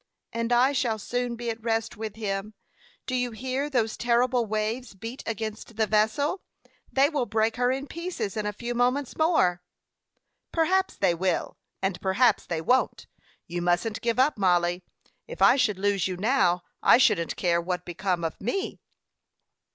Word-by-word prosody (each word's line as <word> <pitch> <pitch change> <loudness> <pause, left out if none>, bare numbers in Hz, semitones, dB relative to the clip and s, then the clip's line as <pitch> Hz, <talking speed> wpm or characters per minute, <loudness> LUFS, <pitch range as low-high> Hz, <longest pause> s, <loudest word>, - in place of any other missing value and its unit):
"And 230 +1 -2
I 245 +3 +5
shall 245 -5 0
soon 245 +3 -2
be 235 0 -3
at 225 0 -8
rest 225 0 -1
with 215 -1 -6
him. 210 -1 -4 0.5
Do 255 - -4
you 250 -1 0
hear 260 +5 -3
those 230 -6 0
terrible 240 0 +2
waves 215 +2 -2
beat 230 +7 -7
against 220 0 -5
the 220 0 +2
vessel? 220 - +1 0.5
They 270 +1 +4
will 285 -5 -1
break 220 +2 +1
her 245 0 +2
in 270 +2 -2
pieces 335 - -4
in 210 -1 -2
a - - -1
few 235 +4 -5
moments 250 +3 0
more." 250 - +2 0.9
"Perhaps 375 +4 +1
they 185 -3 +3
will, 180 0 -1 0.3
and 190 -2 -1
perhaps 200 +6 +2
they 165 -2 -2
won't. 255 +10 +1 0.4
You 175 0 -4
mustn't 175 +5 0
give 235 0 0
up, 265 -2 +3
Mollie. 175 -1 +2 0.5
If - - -9
I - - +7
should 235 -8 +1
lose 200 -1 +1
you 185 -1 -4
now, 185 -5 +2 0.2
I - - +7
shouldn't 210 -10 +2
care 170 -2 +1
what 180 +1 -3
became 180 0 -2
of 165 - -4
me." 310 - -2
225 Hz, 165 wpm, -26 LUFS, 195-255 Hz, 0.9 s, I